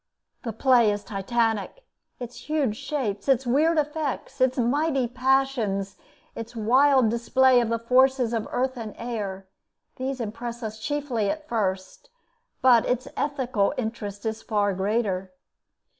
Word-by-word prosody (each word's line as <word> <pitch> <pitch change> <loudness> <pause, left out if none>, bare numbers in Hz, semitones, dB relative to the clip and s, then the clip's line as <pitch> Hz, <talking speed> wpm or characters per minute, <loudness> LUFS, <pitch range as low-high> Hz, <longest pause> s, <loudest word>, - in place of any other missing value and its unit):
The 235 - -4
play 240 0 +4
is 205 0 -2
Titanic. 225 - -1 0.3
Its 245 +3 -9
huge 285 -8 +1
shapes, 220 -6 -3
its 265 -1 +3
weird 305 +7 +3
effects, 295 -2 -2
its 260 +1 +3
mighty 270 +2 +1
passions, 250 -6 0 0.4
its 230 +1 -8
wild 255 +2 +4
display 245 +2 +4
of 235 - -1
the 230 - +1
forces 255 +1 +3
of 225 -2 -2
earth 260 +1 -1
and 220 -3 -6
air, 205 -5 -4 0.5
these 260 0 -3
impress 235 +2 -5
us 220 0 -5
chiefly 260 -5 -1
at 310 +3 -4
first; 195 - -3 0.5
but 245 -3 +6
its 250 +2 -1
ethical 260 -6 0
interest 220 -4 -5
is 220 0 -2
far 205 -3 0
greater. 190 -1 -1
240 Hz, 135 wpm, -25 LUFS, 215-265 Hz, 0.5 s, but